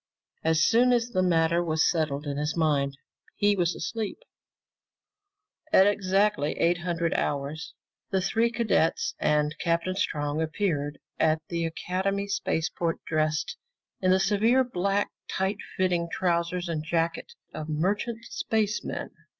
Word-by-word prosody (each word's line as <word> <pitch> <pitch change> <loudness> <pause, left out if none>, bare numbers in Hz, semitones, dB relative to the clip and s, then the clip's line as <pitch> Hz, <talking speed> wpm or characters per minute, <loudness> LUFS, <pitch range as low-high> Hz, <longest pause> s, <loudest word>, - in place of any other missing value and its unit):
As 160 -1 +3
soon 245 +6 +4
as 235 0 +1
the 185 - +1
matter 170 -1 +3
was 160 -1 +2
settled 155 -3 0
in 140 -1 -3
his 150 +3 -2
mind, 140 -4 +1 0.4
he 205 0 +3
was 175 -2 +1
asleep. 220 +4 -3 1.5
At 190 - +7
exactly 200 -4 +2
0800 170 -1 +1
hours 145 +3 -2 0.3
the 190 - +1
three 225 +5 +1
cadets 240 - +1
and 150 0 +2
Captain 170 +2 0
Strong 150 -5 -1
appeared 155 -4 -1 0.2
at 160 0 +3
the 170 -1 -1
Academy 190 +4 -2
spaceport 165 -3 -1
dressed 155 - 0 0.4
in 185 - +2
the 185 +1 +5
severe 215 +6 +3
black 200 -3 0 0.2
tight 190 +2 -1 0.2
fitting 175 -2 +1
trousers 175 0 0
and 160 -2 -2
jacket 165 - -1 0.2
of 155 0 -6
merchant 205 +9 -1
spacemen. 215 -1 -2
175 Hz, 125 wpm, -27 LUFS, 160-200 Hz, 1.5 s, At